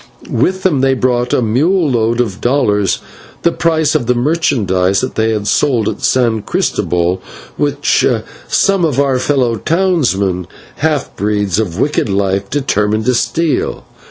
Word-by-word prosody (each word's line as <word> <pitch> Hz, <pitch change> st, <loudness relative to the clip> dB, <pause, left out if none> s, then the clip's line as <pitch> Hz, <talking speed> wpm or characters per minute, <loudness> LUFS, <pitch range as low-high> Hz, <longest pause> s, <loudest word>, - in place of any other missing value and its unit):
With 190 Hz, 0 st, 0 dB
them 150 Hz, -8 st, +2 dB
they 135 Hz, 0 st, +2 dB
brought 125 Hz, -1 st, 0 dB
a 125 Hz, -, +2 dB
mule 155 Hz, -, +2 dB
load 115 Hz, 0 st, +1 dB
of 105 Hz, -5 st, -4 dB
dollars, 105 Hz, -7 st, +1 dB, 0.4 s
the 170 Hz, -, +3 dB
price 160 Hz, -3 st, +1 dB
of 140 Hz, -7 st, 0 dB
the 125 Hz, -, +2 dB
merchandise 115 Hz, -, +1 dB
that 130 Hz, -, -3 dB
they 110 Hz, 0 st, 0 dB
had 105 Hz, -2 st, -2 dB
sold 120 Hz, -6 st, +1 dB
at -, -, -3 dB
San 115 Hz, -4 st, +1 dB
Christobel, 90 Hz, -1 st, -1 dB, 0.3 s
which 145 Hz, 0 st, +1 dB, 0.4 s
some 195 Hz, -2 st, +2 dB
of 145 Hz, -5 st, +1 dB
our 135 Hz, -2 st, +2 dB
fellow 125 Hz, -4 st, +1 dB
townsmen, 115 Hz, -, 0 dB, 0.3 s
half 150 Hz, -3 st, -1 dB
breeds 105 Hz, -2 st, 0 dB
of 90 Hz, -6 st, -2 dB
wicked 145 Hz, -5 st, 0 dB
life, 100 Hz, 0 st, -1 dB
determined 110 Hz, -6 st, 0 dB
to 125 Hz, -, +2 dB
steal. 145 Hz, +7 st, -1 dB
125 Hz, 150 wpm, -14 LUFS, 105-145 Hz, 0.4 s, the